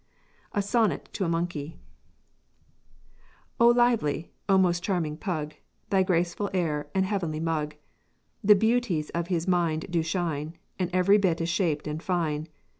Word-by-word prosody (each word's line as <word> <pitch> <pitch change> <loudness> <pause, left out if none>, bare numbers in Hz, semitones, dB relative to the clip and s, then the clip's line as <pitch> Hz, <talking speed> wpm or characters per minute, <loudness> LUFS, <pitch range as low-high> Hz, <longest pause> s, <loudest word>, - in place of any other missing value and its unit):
SONNET 205 - +1
TO 190 - -1
A - - -1
MONKEY 165 -2 -3 1.8
O 235 - +7
lively, 235 -11 +2 0.2
O 195 - +6
most 175 -2 +3
charming 170 -6 -1
pug: 155 -4 -3 0.4
Thy 195 -1 +4
graceful 180 +2 0
air 150 -5 -1
and 190 0 +3
heavenly 180 -6 -2
mug! 155 -2 -2 0.7
The 210 +1 +7
beauties 220 -7 +1
of 170 0 -2
his 175 -2 -1
mind 170 -3 +1
do 170 -2 +2
shine, 160 -2 -2 0.2
And 180 -2 0
every 185 +3 +4
bit 180 -4 +1
is 165 0 -1
shaped 170 -4 0
and 150 +1 -4
fine. 160 -4 -1
170 Hz, 140 wpm, -27 LUFS, 155-190 Hz, 1.8 s, O